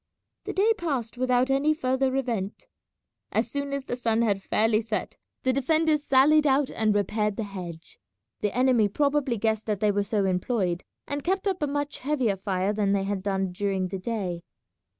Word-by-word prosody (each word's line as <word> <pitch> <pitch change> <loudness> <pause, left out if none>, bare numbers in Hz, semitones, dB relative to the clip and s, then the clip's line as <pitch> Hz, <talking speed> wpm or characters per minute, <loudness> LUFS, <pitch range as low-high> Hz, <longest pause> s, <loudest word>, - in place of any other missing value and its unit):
The - - -3
day 430 +4 +3
passed 270 -10 -2
without 255 +1 +2
any 290 +3 +3
further 260 -1 0
event. 230 -7 -2 0.7
As - - 0
soon 280 0 -2
as 280 -1 -3
the 245 - -2
sun 230 -2 +1
had 200 -3 +1
fairly 215 +2 +2
set 215 -1 -3 0.3
the 260 - +2
defenders 310 +3 +2
sallied 295 +3 +5
out 275 0 +2
and 215 -2 +1
repaired 210 +1 0
the 225 - -1
hedge. 175 -5 -8 0.4
The 210 +2 -2
enemy 250 -4 +4
probably 280 +1 +1
guessed 220 +1 -1
that 210 -3 -1
they 210 0 +3
were 205 0 +1
so 200 0 0
employed, 185 -1 0 0.2
and 285 0 -3
kept 385 +3 0
up 375 -3 -1
a 295 - +1
much 290 +1 -3
heavier 260 -7 0
fire 190 +1 -1
than 205 -2 +1
they 195 -1 +1
had 195 -1 -2
done 195 -1 -1
during 190 -1 -1
the 190 0 -4
day. 185 -5 -3
225 Hz, 185 wpm, -26 LUFS, 200-275 Hz, 0.7 s, sallied